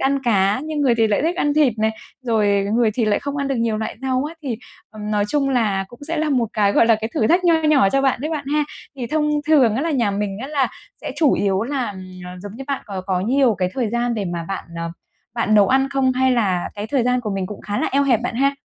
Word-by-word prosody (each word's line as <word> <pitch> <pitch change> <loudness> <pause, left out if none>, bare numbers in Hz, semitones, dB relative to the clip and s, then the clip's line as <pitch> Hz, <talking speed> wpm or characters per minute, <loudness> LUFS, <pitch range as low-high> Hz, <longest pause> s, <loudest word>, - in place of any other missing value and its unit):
ăn 275 0 +1
cá, 205 -2 +2
nhưng 310 -1 -3
người 265 -4 +3
thì 225 -1 +3
lại 215 +4 +1
thích 335 +3 0
ăn 295 -5 +1
thịt 295 -5 +4
nè, 220 0 +2 0.3
rồi 205 -4 +1
người 235 -2 +3
thì 235 - +1
lại 210 -1 +2
không 285 0 -4
ăn 280 -1 -1
được 275 - 0
nhiều 230 -2 0
loại 220 -1 -4
rau 260 0 0
á, 325 - -10
thì, 255 -6 -3 0.3
ừm, 210 -1 -6
nói 205 -1 +1
chung 285 +1 +1
là 215 -7 +1
cũng 240 - -15
sẽ 335 - -1
là 310 0 0
một 245 -5 +1
cái, 205 -2 +2
gọi 230 - +4
là, 225 - +5
cái 220 - -2
thử 220 - +2
thách 355 +6 +3
nho 340 -1 +5
nhỏ 300 -9 +4
cho 275 - +2
bạn 270 -3 +1
đấy 305 +4 -3
bạn 300 -3 -3
ha. 300 0 +2 0.3
Thì 250 -3 -4
thông 300 +3 0 0.2
thường 270 -8 +4
á, 260 - -1
là 330 - -1
nhà 240 -8 +1
mình 200 -1 -3
á, 260 - -4
là 285 -3 +1 0.3
sẽ - - -5
chủ 305 -4 +4
yếu 195 0 +1
là, 260 +1 -2
ừm, 190 -2 -9 0.2
ờ, 180 - -7
giống 205 -1 -7
như 270 - -7
bạn, 280 -2 -3
có 195 -2 -5
có 185 -2 0
nhiều 250 +3 +2
cái 180 -1 -1
thời 250 -4 0
gian 240 +1 0
để 210 -3 -2
mà 175 -2 -4
bạn, 195 - -4
ờ, 170 0 -4 0.4
bạn 230 -2 +1
nấu 205 -2 +5
ăn 270 +1 +3
không? 270 -2 +2
Hay 260 0 +2
là 195 -7 0
cái 205 0 -5
thời 265 +2 +1
gian 250 +1 +1
của 220 -3 -4
mình 195 -2 -2
cũng 210 - -8
khá 205 0 -3
là - - 0
eo 280 +1 +3
hẹp 250 -5 +2
bạn 240 0 -3
ha? 275 +3 +2
240 Hz, 285 wpm, -21 LUFS, 210-275 Hz, 0.4 s, là